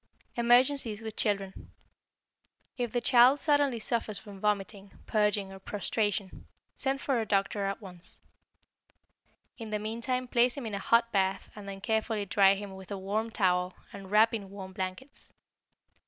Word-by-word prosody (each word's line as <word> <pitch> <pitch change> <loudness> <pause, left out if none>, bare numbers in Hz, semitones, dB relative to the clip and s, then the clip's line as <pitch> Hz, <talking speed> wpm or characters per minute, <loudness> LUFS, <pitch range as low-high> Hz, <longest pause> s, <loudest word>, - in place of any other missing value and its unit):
=Emergencies 240 -2 +3
with 220 -1 -6
Children.= 195 -3 -2 1.1
If 245 -3 -2
the 245 - 0
child 255 +3 +6
suddenly 290 -5 +2
suffers 225 -2 -2
from 200 -1 -11
vomiting, 200 -1 -2
purging, 210 -2 +1
and 195 0 -12
prostration, 205 -2 -2 0.3
send 270 0 -2
for 265 -4 0
a - - -2
doctor 200 0 0
at 195 +2 -3
once. 180 -2 -12 1.4
In 225 -1 -6
the 215 - -1
meantime 235 +4 -3
place 245 +2 +3
him 275 - -5
in 220 - -5
a 200 - -2
hot 230 +3 +3
bath 190 -1 0
and 205 -2 -8
then 195 0 -7
carefully 220 -1 0
dry 195 0 +5
him 200 -1 -7
with 190 0 -11
a 200 - -4
warm 205 +4 -2
towel 180 -4 +1 0.2
and 195 -1 -9
wrap 215 +3 +5
in 200 -4 -4
warm 190 -1 -9
blankets. 190 +10 -6
210 Hz, 155 wpm, -30 LUFS, 195-235 Hz, 1.4 s, child